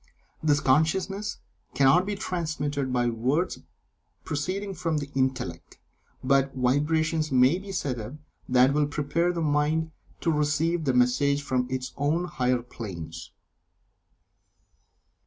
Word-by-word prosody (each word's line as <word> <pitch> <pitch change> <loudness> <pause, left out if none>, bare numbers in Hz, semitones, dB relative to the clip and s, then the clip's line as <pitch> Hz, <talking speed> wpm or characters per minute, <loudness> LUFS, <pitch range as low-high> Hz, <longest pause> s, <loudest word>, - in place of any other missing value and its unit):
This 145 -2 +3
consciousness 190 +9 +1 0.4
cannot 140 +8 +4
be 205 - -1
transmitted 150 -7 -2
by 120 -1 +1
words 130 +10 0 0.6
proceeding 185 +7 -3
from 165 -4 -1
the 145 -1 -5
Intellect, 130 -11 -2 0.5
but 135 0 +2
vibrations 155 +4 +1
may 130 +7 +4
be 195 +1 -8
set 135 -9 -2
up 110 +6 -7 0.3
that 125 +2 +5
will 150 0 +2
prepare 150 +4 0
the 170 -1 -3
mind 155 +1 +1 0.3
to 165 - +1
receive 155 +2 +1
the 130 - +2
message 140 +3 +2
from 130 -2 0
its 130 -1 -4
own 155 +5 +1
higher 125 -8 0
planes. 95 -9 -8
145 Hz, 120 wpm, -26 LUFS, 130-165 Hz, 0.6 s, that